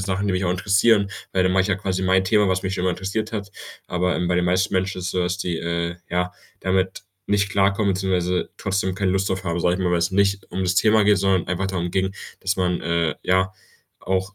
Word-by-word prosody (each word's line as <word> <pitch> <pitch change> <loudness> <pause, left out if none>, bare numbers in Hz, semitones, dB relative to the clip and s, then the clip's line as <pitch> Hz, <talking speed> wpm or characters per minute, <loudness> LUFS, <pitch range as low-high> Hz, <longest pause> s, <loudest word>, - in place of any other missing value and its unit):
Sachen, 100 +1 -1
die 100 - +1
mich 90 +1 0
auch 85 - +1
interessieren. 100 +3 +3 0.2
Weil 95 - +2
dann 90 - +2
mache 95 0 +4
ich 95 - -2
ja 95 - +1
quasi 95 -2 -2
mein 95 0 +3
Thema, 105 0 +3
was 95 0 0
mich 95 - -2
schon 90 - -3
immer 90 - +2
interessiert 100 +5 -3
hat.“ 105 -2 -4 0.4
Aber, 90 +1 0
ähm, 90 - -1
bei 90 - +1
den 90 - +2
meisten 90 +1 +1
Menschen 95 0 0
ist - - -6
es 90 - -1
so, 90 - -1
dass 90 0 -1
die, 85 -4 -2
äh, 85 +1 -2
ja, 90 0 -1 0.3
damit 95 +1 0 0.2
nicht 100 0 +1
klarkommen, 100 +1 +2
beziehungsweise 90 -2 0
trotzdem 95 -1 -1
keine 95 -1 0
Lust 95 0 0
drauf 95 0 -2
haben, 85 0 -1
sage 90 +1 +2
ich - - -5
mal, 90 -1 +1
weil's 85 +1 +1
nicht 100 0 +1
um 95 - -2
das 90 0 +1
Thema 110 0 +4
geht, 105 0 +5
sondern 95 -1 +1
einfach 90 +1 -1
darum 90 -2 -2
ging, 95 +1 0 0.3
dass 95 0 -1
man, 90 -2 0
äh, 85 -1 0
ja, 95 +1 +2 0.5
auch 95 +1 -2
95 Hz, 245 wpm, -22 LUFS, 90-100 Hz, 0.5 s, geht